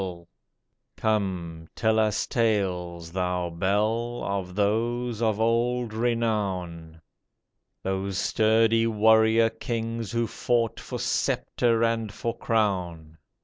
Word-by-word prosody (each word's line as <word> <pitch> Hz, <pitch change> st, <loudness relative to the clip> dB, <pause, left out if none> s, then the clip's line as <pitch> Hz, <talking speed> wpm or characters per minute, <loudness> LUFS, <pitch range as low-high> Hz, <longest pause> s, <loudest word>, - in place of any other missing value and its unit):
PAUL'S 90 Hz, -2 st, -6 dB
6l -, -, -29 dB, 0.7 s
Come, 90 Hz, -7 st, -2 dB
tell 110 Hz, 0 st, +2 dB
us 110 Hz, -1 st, +1 dB
tales, 90 Hz, -8 st, -1 dB
thou 90 Hz, -1 st, -1 dB
bell, 110 Hz, +7 st, 0 dB
Of 95 Hz, -2 st, -3 dB
those 115 Hz, +3 st, 0 dB
of 110 Hz, -2 st, +1 dB
old 115 Hz, +1 st, +1 dB
renown, 100 Hz, -8 st, -2 dB, 0.8 s
Those 95 Hz, 0 st, -2 dB
sturdy 115 Hz, +2 st, +3 dB
warrior 110 Hz, +1 st, +4 dB
kings 115 Hz, -1 st, -4 dB
who 115 Hz, 0 st, 0 dB
fought 115 Hz, +1 st, -1 dB
For -, -, -6 dB
sceptre 115 Hz, -1 st, 0 dB
and 115 Hz, -2 st, 0 dB
for 115 Hz, +2 st, -4 dB
crown. 90 Hz, -9 st, -1 dB
110 Hz, 105 wpm, -26 LUFS, 95-115 Hz, 0.8 s, warrior